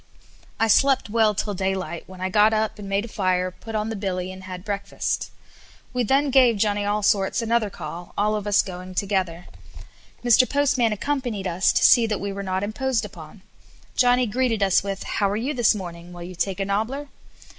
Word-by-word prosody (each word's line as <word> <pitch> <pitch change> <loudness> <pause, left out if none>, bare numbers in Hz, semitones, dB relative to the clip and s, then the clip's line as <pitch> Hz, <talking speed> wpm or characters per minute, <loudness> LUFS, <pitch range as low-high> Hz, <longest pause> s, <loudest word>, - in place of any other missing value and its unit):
I 225 - +4
slept 265 0 +3
well 220 -2 +3
till 205 +1 -2
daylight, 190 -2 -3
when 185 -1 -11
I 185 - -1
got 210 +3 +4
up 215 0 -1
and 200 -1 -7
made 200 +2 0
a - - -8
fire, 185 -4 0
put 225 +4 -9
on 215 +1 -1
the 225 - -3
billy, 185 -2 -3
and 185 0 -10
had 185 0 -8
breakfast. 200 -1 -3 0.6
We 250 - 0
then 275 +5 +2
gave 250 -4 +5
Johnny 205 0 +1
Allsorts 205 0 +1
another 230 -2 +1
call, 175 -2 -8
all 210 +1 +2
of 210 -1 -4
us 205 0 +4
going 185 -1 -8
together. 185 -4 -1 0.8
Mr. 245 +1 +5
Postman 270 -5 +2
accompanied 240 -3 -2
us 180 +1 +2
to - - +2
see 235 -2 +6
that 210 -3 -2
we 200 0 -4
were 200 - -5
not 190 0 -2
imposed 230 +3 -1
upon. 180 0 -12 0.5
Johnny 250 0 +4
greeted 230 -1 0
us 195 -2 +4
with, 195 0 -4
"How 200 -2 0
are 205 - -1
you 260 +7 -2
this 240 -4 +3
morning? 175 -3 -8
Will 175 0 -8
you 180 +1 -8
take 190 +2 -2
a 195 - 0
nobbler?" 225 +9 -2
205 Hz, 200 wpm, -23 LUFS, 190-230 Hz, 0.8 s, see